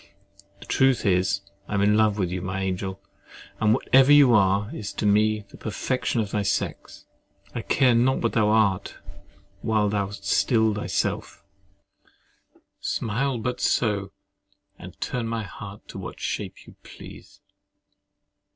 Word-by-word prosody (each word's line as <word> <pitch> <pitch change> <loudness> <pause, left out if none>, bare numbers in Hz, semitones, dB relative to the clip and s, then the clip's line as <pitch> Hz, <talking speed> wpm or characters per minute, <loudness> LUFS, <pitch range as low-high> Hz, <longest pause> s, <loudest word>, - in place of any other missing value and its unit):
The - - -12
truth 130 -2 +2
is, 95 0 +2 0.3
I 105 - -3
am 100 - +1
in 105 +1 +4
love 110 -1 +3
with 90 -4 -1
you, 90 0 -3
my 95 +1 -3
angel; 95 +1 -3 0.6
and 110 -1 +3
whatever 135 +3 +4
you 145 -4 +7
are, 100 0 +2
is 105 - -5
to - - -3
me 105 +1 +3
the - - -14
perfection 120 +3 -2
of 105 -2 -4
thy 105 - 0
sex. 100 - -3 0.5
I - - -3
care 125 -2 +3
not 125 +3 +3
what 115 - -1
thou 105 -2 +3
art, 105 -3 +1 0.7
while 110 -2 +1
thou 100 -1 -1
art 100 0 -10
still 110 +1 +2
thyself. 105 - -3 1.4
Smile 125 +4 -1
but 125 +2 -3
so, 100 -4 0 0.7
and - - -11
turn 120 -2 -3
my 115 -1 -2
heart 100 +1 -10
to - - -8
what - - -8
shape - - -5
you - - -14
please! - - -13
105 Hz, 150 wpm, -25 LUFS, 100-115 Hz, 1.4 s, you